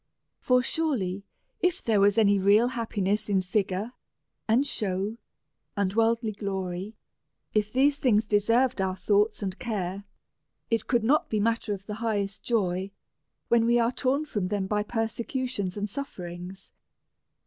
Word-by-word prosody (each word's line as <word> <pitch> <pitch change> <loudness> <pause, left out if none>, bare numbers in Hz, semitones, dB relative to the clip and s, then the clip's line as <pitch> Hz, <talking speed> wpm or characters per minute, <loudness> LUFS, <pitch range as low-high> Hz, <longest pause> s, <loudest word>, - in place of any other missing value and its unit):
For 250 0 +3
surely, 210 - -1 0.3
if 360 -4 0
there 220 -3 +2
was 200 +1 +4
any 205 -2 +4
real 205 +5 +4
happiness 215 -4 -1
in 190 -2 +2
figure 200 +3 -1 0.5
and 235 +6 +3
show, 205 -2 -1 0.6
and 195 -2 +1
worldly 225 0 +2
glory; 195 0 -4 0.6
if 215 0 +1
these 280 +3 +3
things 220 -4 +3
deserved 230 +3 +2
our 190 -1 0
tlioughts 205 +2 +1
and 190 0 -4
care, 200 -5 -3 0.7
it 225 -2 +1
could 240 -3 +2
not 285 +7 +2
be 215 - 0
a - - +1
mat 230 +2 +1
ter 210 -2 -2
of 195 0 -13
the 210 - -5
highest 205 -4 -1
joy, 190 -5 0 0.6
when 230 -1 +3
we 240 0 +4
are 235 0 +2
torn 275 +4 0
from 205 -10 -2
them 200 0 -1
by 210 +2 0
persecutions 225 -2 -2
and 205 0 -2
sufferings? 185 -6 -7
210 Hz, 150 wpm, -27 LUFS, 195-235 Hz, 0.7 s, was